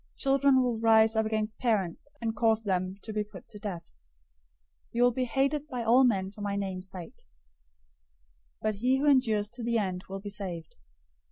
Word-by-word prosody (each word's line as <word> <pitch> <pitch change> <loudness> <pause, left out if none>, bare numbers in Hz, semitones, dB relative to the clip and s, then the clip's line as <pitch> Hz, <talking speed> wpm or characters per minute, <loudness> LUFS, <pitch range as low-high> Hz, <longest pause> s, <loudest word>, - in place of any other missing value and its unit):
Children 275 -1 +4
will 240 -3 -1
rise 225 0 +5
up 220 0 +2
against 215 0 -2
parents, 210 -4 0
and 225 -1 -2
cause 225 0 +2
them 185 -1 -1
to 220 - -6
be 210 0 0
put 210 - -13
to 210 - -9
death. 195 -5 -5
010:022 - - -28 1.0
You 240 +1 +2
will 245 - +5
be 255 +2 -1
hated 275 +4 0
by 250 -5 -4
all 245 +4 +5
men 195 -5 +1
for 210 - -12
my 200 -1 -2
name's 190 -2 -4
sake, 180 - -11 1.4
but 215 -1 0
he 255 +5 +2
who 280 - -1
endures 235 -7 +3
to 240 +1 -9
the 235 0 +1
end 185 -3 -2
will 195 0 -5
be 205 +1 -7
saved. 180 -6 -6
220 Hz, 190 wpm, -29 LUFS, 200-245 Hz, 1.4 s, rise